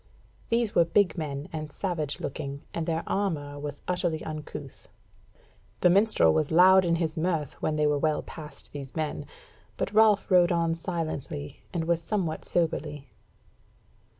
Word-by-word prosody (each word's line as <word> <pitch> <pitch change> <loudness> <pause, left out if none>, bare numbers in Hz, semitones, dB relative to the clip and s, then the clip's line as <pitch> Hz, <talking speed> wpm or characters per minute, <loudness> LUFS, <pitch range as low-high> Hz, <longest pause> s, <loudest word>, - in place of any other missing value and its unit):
These 230 -2 +1
were 170 - +6
big 185 +1 +2
men, 150 -3 -4
and 155 -2 -5
savage 155 -4 -3
looking, 140 0 -5
and 165 0 -3
their 165 0 0
armour 150 -8 -2
was 145 0 -6
utterly 175 -3 -1
uncouth. 155 -1 -8 0.9
The 180 - +6
minstrel 195 - +4
was 150 - +1
loud 185 +3 +7
in 170 -1 +2
his 165 -2 -1
mirth 160 -4 -1
when 155 - 0
they 150 0 +2
were 150 -1 +2
well 155 0 +1
past 155 -2 -11
these 140 -2 -8
men; 155 -2 -3 0.5
but 195 - -2
Ralph 215 -2 +4
rode 180 -1 +6
on 165 -1 +2
silently, 160 - -4
and 170 -2 -1
was 170 0 +1
somewhat 170 -3 -2
soberly. 150 -4 -1
160 Hz, 150 wpm, -27 LUFS, 150-180 Hz, 0.9 s, loud